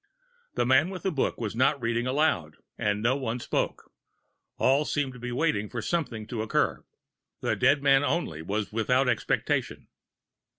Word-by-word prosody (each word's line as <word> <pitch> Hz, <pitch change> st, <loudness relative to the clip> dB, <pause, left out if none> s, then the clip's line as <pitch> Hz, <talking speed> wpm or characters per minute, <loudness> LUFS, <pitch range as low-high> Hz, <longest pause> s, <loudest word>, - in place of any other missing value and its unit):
The 120 Hz, -, +1 dB
man 130 Hz, +7 st, +4 dB
with 185 Hz, -2 st, -7 dB
the 190 Hz, -, 0 dB
book 140 Hz, -, -1 dB
was 110 Hz, -2 st, -3 dB
not 130 Hz, +4 st, +3 dB
reading 120 Hz, 0 st, -1 dB
aloud, 130 Hz, -, 0 dB, 0.2 s
and 105 Hz, 0 st, -1 dB
no 125 Hz, +3 st, +3 dB
one 125 Hz, -3 st, -3 dB
spoke; -, -, -3 dB, 0.7 s
all 135 Hz, +3 st, +3 dB
seemed 145 Hz, -3 st, -1 dB
to 125 Hz, -, -11 dB
be 125 Hz, +1 st, -5 dB
waiting 115 Hz, -7 st, 0 dB
for 120 Hz, -, -4 dB
something 120 Hz, -5 st, -2 dB
to 115 Hz, 0 st, -4 dB
occur; 110 Hz, -, 0 dB, 0.6 s
the -, -, 0 dB
dead 140 Hz, +1 st, +3 dB
man 135 Hz, 0 st, +5 dB
only 145 Hz, -, -1 dB
was 100 Hz, +4 st, -3 dB
without 125 Hz, +4 st, +2 dB
expectation. 120 Hz, -4 st, -1 dB
125 Hz, 165 wpm, -27 LUFS, 110-140 Hz, 0.7 s, man